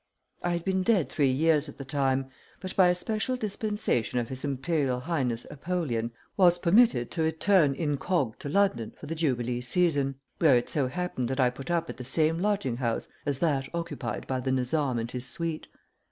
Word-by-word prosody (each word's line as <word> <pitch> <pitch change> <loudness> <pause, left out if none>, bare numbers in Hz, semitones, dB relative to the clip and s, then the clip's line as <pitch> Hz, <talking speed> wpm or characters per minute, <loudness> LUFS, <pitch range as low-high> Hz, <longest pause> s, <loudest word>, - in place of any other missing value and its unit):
I 175 - 0
had 170 -1 -3
been 190 -1 +1
dead 190 -5 +2
three 140 -3 +2
years 150 +2 +2
at - - -12
the 135 - -7
time, 135 -1 0 0.3
but, 185 +1 -6
by 185 -2 +6
a 180 - +3
special 215 +7 -2
dispensation 210 - -1
of 120 -2 -1
his 130 0 -6
Imperial 135 -2 0
Highness 130 -7 -1
Apollyon, 140 -8 -2 0.3
was 175 -3 +5
permitted 175 - +4
to 165 - -1
return 160 -1 +3
incog 145 -4 -1
to 145 - -5
London 160 - +1
for - - -9
the 155 - -4
jubilee 125 -6 0
season, 140 0 +2 0.2
where 145 -7 +6
it 120 - -2
so 140 -4 +1
happened 175 -4 -3
that 130 +2 -3
I 125 -1 +4
put 135 +5 -9
up 170 -1 0
at - - -7
the 130 - -6
same 155 +5 +1
lodging 195 - 0
house 120 -3 -2 0.2
as 140 -2 +1
that 140 -4 0
occupied 165 -7 -4
by 130 -1 -2
the 130 +1 -1
Nizam 130 0 0
and 115 +1 -3
his 125 0 -4
suite. 165 +2 -4
145 Hz, 195 wpm, -28 LUFS, 130-175 Hz, 0.3 s, by